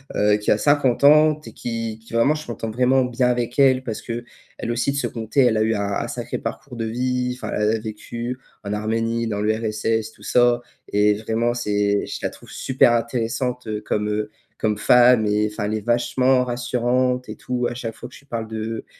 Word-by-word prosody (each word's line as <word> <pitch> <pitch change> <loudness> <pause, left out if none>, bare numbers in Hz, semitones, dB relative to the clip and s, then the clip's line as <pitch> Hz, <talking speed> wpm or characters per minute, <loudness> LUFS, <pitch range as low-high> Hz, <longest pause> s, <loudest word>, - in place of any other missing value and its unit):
heu, 105 0 +4
qui 105 - -3
a - - +4
50 140 -1 +2
ans 150 +1 +6
et - - -10
qui 115 -2 -4
qui 115 +1 -16
vraiment, 115 +6 +4
je 155 0 -8
m'entends 115 -1 -4
vraiment 130 +3 +3
bien 125 0 +1
avec 120 +1 -1
elle 130 -2 +5
parce 115 -4 -5
qu'elle 120 0 -7
aussi 120 +3 0
de - - -5
son 125 -4 -1
coté, 115 +5 0
elle 120 -4 +4
a 110 - +2
eu 110 +1 +1
un 100 - -1
un 100 0 -2
sacré - - -4
parcours 135 -3 -6
de 115 - -2
vie, 125 +2 -1
enfin, 125 - -6
elle 105 0 +2
a - - -3
vécu 115 +3 -6 0.2
en 100 - -5
Arménie, 115 +2 -1
dans 105 -2 -2
l'URSS, 110 +1 -1
tout - - -19
ça 120 -1 +3 0.3
et 105 +1 +4
vraiment 115 +2 -1
c'est 105 -3 0
je - - -5
la - - 0
trouve - - -15
super 130 -2 +2
intéressante, 120 +1 -1
heu, 105 -1 -3
comme, 105 0 -1
heu, 105 0 -2 0.3
comme 105 -1 0
femme 120 +2 +5
et 105 +1 +1
enfin, 105 -1 -3
elle 105 +1 -1
est 110 - -3
vachement 125 +2 +2
rassurante 125 +1 0
et - - -5
tout. 125 -1 -2
À - - -5
chaque 115 -3 -5
fois - - -9
que - - -15
je - - -13
lui - - -26
parle 115 -3 -4
de, 110 0 -4
115 Hz, 220 wpm, -22 LUFS, 110-125 Hz, 0.3 s, ans